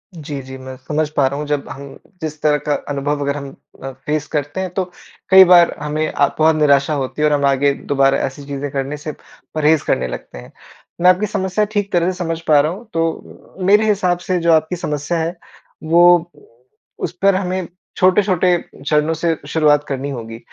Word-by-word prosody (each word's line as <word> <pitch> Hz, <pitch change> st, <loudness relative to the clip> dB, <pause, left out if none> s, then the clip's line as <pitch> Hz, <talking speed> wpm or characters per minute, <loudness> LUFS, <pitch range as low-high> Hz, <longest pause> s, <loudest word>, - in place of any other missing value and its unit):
जी, 145 Hz, -3 st, -6 dB
जी 130 Hz, 0 st, -10 dB
मैं 130 Hz, 0 st, -9 dB
समझ 150 Hz, 0 st, 0 dB
पा 145 Hz, -2 st, +1 dB
रहा 140 Hz, +2 st, -4 dB
हूँ। 150 Hz, -, -4 dB
जब 145 Hz, -1 st, -2 dB
हम 140 Hz, +1 st, -9 dB, 0.2 s
जिस 155 Hz, -1 st, -5 dB
तरह 150 Hz, -1 st, +3 dB
का 150 Hz, -, +2 dB, 0.2 s
अनुभव 145 Hz, +1 st, -2 dB
अगर 140 Hz, 0 st, -1 dB
हम 140 Hz, -1 st, -7 dB, 0.3 s
अ, 135 Hz, -, -5 dB
फ़ेस 150 Hz, +3 st, -4 dB
करते 145 Hz, +4 st, -2 dB
हैं 185 Hz, -, -3 dB
तो 190 Hz, -, 0 dB, 0.5 s
कई 190 Hz, 0 st, +9 dB
बार 175 Hz, -1 st, +6 dB
हमें 150 Hz, +1 st, -2 dB
अ, 145 Hz, -, +2 dB
बहुत 160 Hz, 0 st, +4 dB
निराशा 145 Hz, -1 st, +3 dB
होती 140 Hz, +1 st, -3 dB
है 150 Hz, -, +4 dB
और -, -, +1 dB
हम 140 Hz, -1 st, +1 dB
आगे 140 Hz, +1 st, +2 dB, 0.2 s
दोबारा 135 Hz, -1 st, +3 dB
ऐसी 140 Hz, +2 st, -7 dB
चीज़ें 140 Hz, 0 st, -4 dB
करने 140 Hz, +2 st, -3 dB
से 150 Hz, +1 st, -6 dB, 0.4 s
परहेज़ 155 Hz, 0 st, +3 dB
करने 65 Hz, -, 0 dB
लगते 60 Hz, -, -8 dB
हैं। -, -, -12 dB, 0.5 s
मैं 180 Hz, -, +6 dB
आपकी 185 Hz, +3 st, +3 dB
समस्या 200 Hz, 0 st, -1 dB
ठीक 205 Hz, -1 st, -1 dB
तरह 175 Hz, +1 st, +2 dB
से 185 Hz, -, -9 dB
समझ 165 Hz, -2 st, -3 dB
पा 150 Hz, -2 st, +6 dB
रहा 150 Hz, +2 st, +1 dB
हूँ। 215 Hz, +6 st, -9 dB
तो 165 Hz, 0 st, -4 dB
मेरे 210 Hz, +3 st, +4 dB
हिसाब 185 Hz, -4 st, +1 dB
से 185 Hz, -1 st, +1 dB
जो 170 Hz, 0 st, +2 dB
आपकी 160 Hz, +3 st, +1 dB
समस्या 150 Hz, 0 st, -3 dB
है 165 Hz, +2 st, -2 dB, 0.5 s
वो 175 Hz, +1 st, +4 dB, 0.7 s
उस -, -, -3 dB
पर 195 Hz, -1 st, +4 dB
हमें 185 Hz, -1 st, -2 dB, 0.3 s
छोटे-छोटे 185 Hz, -1 st, +3 dB, 0.3 s
चरणों 150 Hz, +1 st, +2 dB
से 165 Hz, 0 st, 0 dB
शुरुआत 150 Hz, -2 st, +3 dB
करनी 140 Hz, +1 st, -3 dB
होगी। 115 Hz, -3 st, -7 dB
155 Hz, 200 wpm, -18 LUFS, 140-175 Hz, 0.7 s, कई